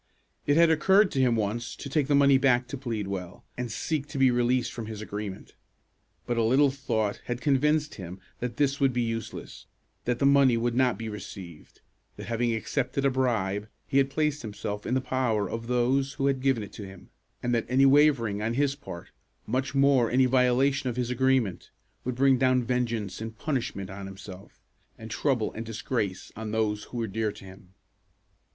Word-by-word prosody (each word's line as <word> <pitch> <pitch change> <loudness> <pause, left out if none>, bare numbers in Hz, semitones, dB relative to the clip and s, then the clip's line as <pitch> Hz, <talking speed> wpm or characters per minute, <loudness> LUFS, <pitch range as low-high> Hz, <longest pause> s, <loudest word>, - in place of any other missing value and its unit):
It 145 +1 +4
had 165 -1 +6
occurred 190 +6 +4
to 135 - +1
him 125 -3 +3
once 110 +2 -2
to - - -8
take 140 0 0
the 145 - +3
money 140 -1 +5
back 125 -2 +3
to 140 - -4
Pleadwell, 100 -8 -4
and 125 -2 -4
seek 145 +4 -2
to 145 -1 -7
be 135 -1 +5
released 120 +1 +1
from 115 -2 -6
his 110 -2 -6
agreement. 105 -2 -6 0.7
But 120 - -2
a 115 - +3
little 135 +5 +4
thought 110 -7 -2
had 120 0 -3
convinced 150 +3 +2
him 90 -1 -8 0.2
that 120 -1 -4
this 140 -1 +1
would 135 -2 +3
be 120 0 +1
useless; 115 -1 -6 0.4
that 120 0 0
the 135 - +1
money 140 -3 +5
would 120 +1 0
not 125 0 +2
be 115 - -5
received; 95 -6 -9 0.3
that, - - -8
having 120 0 0
accepted 130 +4 -1
a 135 - +4
bribe, 110 -6 0 0.2
he 135 - +2
had 135 0 +2
placed 150 +1 0
himself 105 -1 -5
in 125 - 0
the 130 - +1
power 125 -6 0
of 115 +3 -5
those 130 +3 +1
who 135 - -2
had 135 -2 +1
given 130 -5 +1
it 100 - -10
to 105 - -8
him, 95 -1 -12 0.3
and 120 0 0
that 115 - 0
any 130 +2 +4
wavering 135 -7 +4
on 115 +2 -1
his 140 0 +2
part, 85 - -10 0.3
much 130 +4 -2
more 135 -4 +4
any 130 +1 +4
violation 130 +1 +2
of 120 - -4
his 125 -1 -2
agreement, 130 -6 +1 0.3
would 125 -1 -3
bring 135 0 +4
down 130 -1 +3
vengeance 115 -5 -2
and 110 0 -6
punishment 125 -8 -3
on 95 0 -7
himself, 95 0 -11 0.4
and 110 0 -9
trouble 115 +1 0
and 110 - -5
disgrace 110 -4 -3
on 110 0 -5
those 105 -1 -1
who 125 - -8
were 115 - 0
dear 110 +1 -1
to 100 - -13
him. 95 0 -15
120 Hz, 195 wpm, -27 LUFS, 110-135 Hz, 0.7 s, had